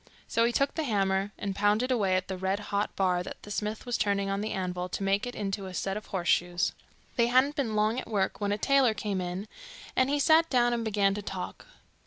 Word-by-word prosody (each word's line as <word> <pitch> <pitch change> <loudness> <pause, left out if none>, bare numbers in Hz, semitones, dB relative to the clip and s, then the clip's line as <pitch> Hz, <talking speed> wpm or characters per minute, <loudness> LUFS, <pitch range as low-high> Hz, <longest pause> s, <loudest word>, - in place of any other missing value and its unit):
So 230 - +2
he 235 - +2
took 275 +3 +1
the 320 - -2
hammer, 195 -5 +1
and 200 -2 -3
pounded 210 +6 +2
away 200 -7 +2
at 185 0 -1
the 190 - -3
red 190 +2 -1
hot 200 +1 0
bar 180 -2 +2
that 180 - -7
the 205 - -9
smith 210 +2 -3
was 245 -1 -1
turning 200 -1 +1
on 195 +1 -1
the 215 - -3
anvil 180 -1 -3
to 195 - -3
make 195 +4 +1
into 200 -4 -3
a 185 - -8
set 195 +1 -2
of 210 - -6
horse 180 -3 -3
shoes. 175 0 +2 0.4
They 235 -1 +4
hadn't 260 +4 +3
been 245 -8 -1
long 215 +3 +2
at 255 - -8
work 205 -1 -1
when 205 0 0
a 205 - +1
tailor 265 -1 +3
came 200 -2 -2
in, 180 +3 -4 0.5
and 260 +1 +3
he 290 - +2
sat 320 +3 +5
down 240 -2 +3
and 235 -1 -1
began 200 -3 +2
to 205 - -4
talk. 195 - -6
205 Hz, 240 wpm, -29 LUFS, 195-235 Hz, 0.5 s, sat